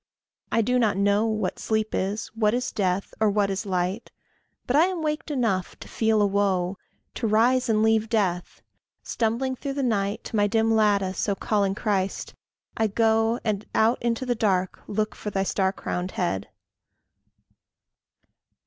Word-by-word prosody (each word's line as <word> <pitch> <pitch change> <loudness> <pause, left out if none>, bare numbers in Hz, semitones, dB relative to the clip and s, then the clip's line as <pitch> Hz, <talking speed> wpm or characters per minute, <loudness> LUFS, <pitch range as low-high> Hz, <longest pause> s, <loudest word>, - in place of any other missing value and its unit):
I 225 0 +2
do 250 +3 +1
not 220 -5 +2
know 205 +2 +2
What 215 -4 -2
sleep 220 -1 0
is, 200 +3 -1
what 220 0 +1
is 250 +1 -2
death, 190 -1 -1
or 215 -1 +3
what 200 -1 +1
is 195 +2 -3
light; 185 +4 -2 0.6
But 250 - 0
I 315 +3 +6
am 365 -3 -3
waked 300 0 -2
enough 225 -10 -1
to - - -11
feel 220 -2 +2
a - - +4
woe, 195 -2 0 0.3
To 230 - -2
rise 235 +4 +3
and 215 -1 +3
leave 220 0 +2
death. 190 -6 -1 0.4
Stumbling 240 +3 -1
through 275 +2 -4
the 275 0 -2
night, 210 -2 -1
To - - -6
my 205 -1 +3
dim 225 +1 +2
lattice, 205 -3 +1
O 200 - +1
calling 200 -1 0
Christ! 200 -3 -2 0.4
I 225 - +1
go, 225 +2 +2
And 215 -2 -1
out 225 +3 +3
into 235 +2 -1
the 250 - +1
dark 190 -5 0
look 215 +1 -1
for 210 - -6
thy 195 -1 -1
star 190 0 +1
crowned 180 -1 -4
head. 100 - -2
215 Hz, 165 wpm, -25 LUFS, 195-230 Hz, 0.6 s, I